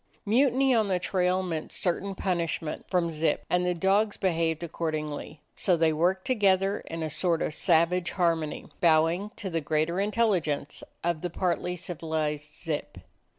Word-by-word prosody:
Mutiny 260 +4 +3
on 220 -3 +3
the 185 -2 +1
trail 185 0 +1
meant 165 -4 -4
certain 195 +1 -1
punishment 170 -4 -2
from 175 -3 +1
Zip, 155 -1 0
and 180 0 +3
the 180 0 0
dogs 200 +4 +2
behaved 165 -3 0
accordingly. 155 -2 -4
So 180 -3 +2
they 160 -1 +3
worked 180 +4 +1
to 255 - +2
gether 195 -2 +2
in 165 0 -6
a - - -1
sort 170 +1 +1
of - - -2
savage 175 +1 +2
harmony, 165 -4 0
bowing 165 +4 +3
to 190 - -5
the 165 -1 -1
greater 155 +4 0
intelligence 195 -9 0 0.2
of 170 -2 0
the 180 - -2
partly 180 +1 -1
civil 165 -2 -6
ized 150 -1 -1
Zip. 150 -1 -5
175 Hz, 160 wpm, -28 LUFS, 160-190 Hz, 0.2 s, Mutiny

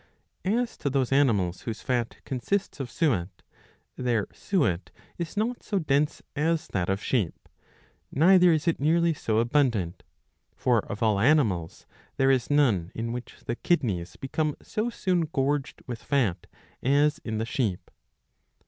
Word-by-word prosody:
As 230 +5 0
to 140 - -1
those 135 -2 0
animals 105 -11 +2
whose 115 -2 -5
fat 120 -2 -1
consists 165 +8 -2
of 135 -3 -4
suet, 100 - -1 0.5
their 120 -5 0
suet 140 - 0 0.3
is 170 +3 -5
not 235 +3 -1
so 205 - -2
dense 150 -3 +1
as 160 +2 0
that 90 -2 -1
of 95 +2 -1
sheep, 105 -11 -1 0.6
neither 180 +3 +6
is 160 +1 0
it 170 - +2
nearly 165 +3 +3
so 110 -7 -1
abundant; 115 - +1 0.5
for 120 -3 +2
of 105 - -3
all 105 -3 +3
animals 110 - +2 0.3
there 135 0 +4
is 130 -3 +1
none 120 - +2
in 115 +1 -3
which 125 +1 -7
the 120 - -2
kidneys 100 - 0
become 150 +2 -2
so 215 +3 -2
soon 180 -7 0
gorged 145 -1 -1
with 120 -2 -6
fat 115 -11 0 0.3
as 145 +3 +3
in 110 -1 -4
the 110 - -1
sheep. 115 -7 -2
135 Hz, 150 wpm, -27 LUFS, 110-155 Hz, 0.6 s, neither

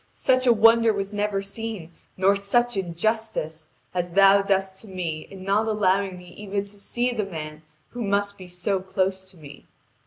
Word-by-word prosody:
Such 255 -1 +2
a - - +8
wonder 230 0 +5
was 200 0 -4
never 205 -1 -1
seen, 200 -4 -6 0.3
nor 195 +2 +4
such 240 +5 +1
injustice, 175 -3 -2 0.3
as 180 -1 -1
Thou 195 +2 +6
dost 195 -1 0
to 220 - -11
me 170 -5 -4
in 190 -1 -10
not 205 +3 +1
allowing 195 -3 +1
me 180 0 -13
even 200 +1 -4
to 200 0 -10
see 240 +4 -1
the 220 -3 -1
man 155 -5 -7 0.3
who 245 - -7
must 200 0 0
be 185 - -11
so 180 +2 -1
close 190 0 -2
to 190 - -17
me. 145 -3 -13
195 Hz, 180 wpm, -24 LUFS, 185-210 Hz, 0.3 s, a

